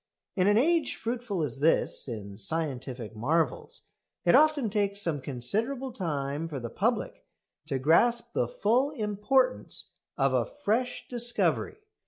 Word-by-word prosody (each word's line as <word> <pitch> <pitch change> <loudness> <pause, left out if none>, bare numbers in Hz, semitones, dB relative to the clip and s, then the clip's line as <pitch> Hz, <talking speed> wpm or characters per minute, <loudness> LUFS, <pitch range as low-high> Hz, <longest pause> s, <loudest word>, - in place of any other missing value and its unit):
In 185 0 +3
an 205 +1 +5
age 320 +3 +2
fruitful 230 -6 -3
as 135 -2 -4
this 155 -1 +3
in 105 -5 -6
scientific 125 -2 -3
marvels, 145 +5 -1 0.4
it 175 - +5
often 300 -3 +5
takes 200 -1 0
some 165 -8 -1
considerable 220 - -2
time 150 - -2
for 145 -4 -5
the 120 -2 -6
public - - -1 0.4
to 140 -3 -1
grasp 230 - +3
the - - +1
full 270 - +1
importance 255 +1 0 0.3
of - - +2
a - - +3
fresh 250 -2 -2
discovery. 240 - 0
200 Hz, 135 wpm, -28 LUFS, -, 0.4 s, an